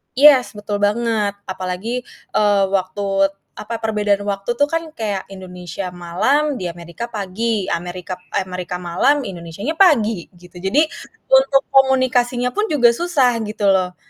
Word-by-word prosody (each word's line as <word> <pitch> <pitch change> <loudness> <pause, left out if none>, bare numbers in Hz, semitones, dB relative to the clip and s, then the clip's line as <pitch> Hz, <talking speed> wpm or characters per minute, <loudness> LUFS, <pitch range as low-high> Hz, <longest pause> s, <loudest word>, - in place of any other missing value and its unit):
Yes, 270 -3 +6
betul 205 0 -3
banget. 215 -1 0 0.2
Apalagi, 185 +3 -4 0.4
eee, 205 -2 +3
waktu, 190 +1 -2 0.6
apa, 220 - -6
perbedaan 210 -2 +1
waktu 200 +4 -2
tuh 285 +4 +1
kan 330 +1 -1
kayak 205 -6 -3
Indonesia 180 0 -7
malam 215 - 0
di 180 - -3
Amerika 170 +7 -7
pagi. 210 0 -2
Amerika 180 +2 -5
p - - -27 0.2
eh, - - 0
Amerika 180 -1 -5
malam 180 +11 +1
Indonesianya 180 - -5
pagi, 230 - +3
gitu. 180 0 -17
Jadi 265 - +3 0.5
untuk 270 +1 +5
komunikasinya 255 -2 +3
pun 420 - +1
juga 250 -6 +5
susah 280 -3 +2
gitu 210 -1 -3
loh. 180 -1 0
210 Hz, 140 wpm, -19 LUFS, 185-255 Hz, 0.6 s, Yes